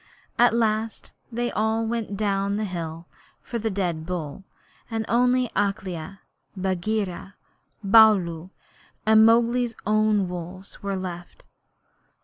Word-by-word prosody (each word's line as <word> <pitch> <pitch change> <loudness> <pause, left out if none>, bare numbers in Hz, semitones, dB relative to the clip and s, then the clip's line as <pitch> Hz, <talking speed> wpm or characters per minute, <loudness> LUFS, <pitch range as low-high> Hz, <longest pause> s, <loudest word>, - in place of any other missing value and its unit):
At 240 -1 +5
last 220 -1 -1 0.2
they 240 +1 -2
all 220 +1 0
went 225 -3 -3
down 200 -1 0
the 215 +1 -1
hill 165 -3 -5 0.4
for 235 - -4
the 225 +1 -1
dead 180 -5 -2
bull, 165 -1 -5 0.5
and 225 -1 -2
only 250 +1 +2
Akela, 195 -2 -2 0.4
Bagheera, 190 +1 -2 0.5
Baloo, 195 -5 +5 0.6
and 220 0 +6
Mowgli's 235 +1 +2
own 215 -2 +2
wolves 180 +2 -7
were 200 -1 -2
left. 180 -2 -7
205 Hz, 115 wpm, -24 LUFS, 185-225 Hz, 0.6 s, and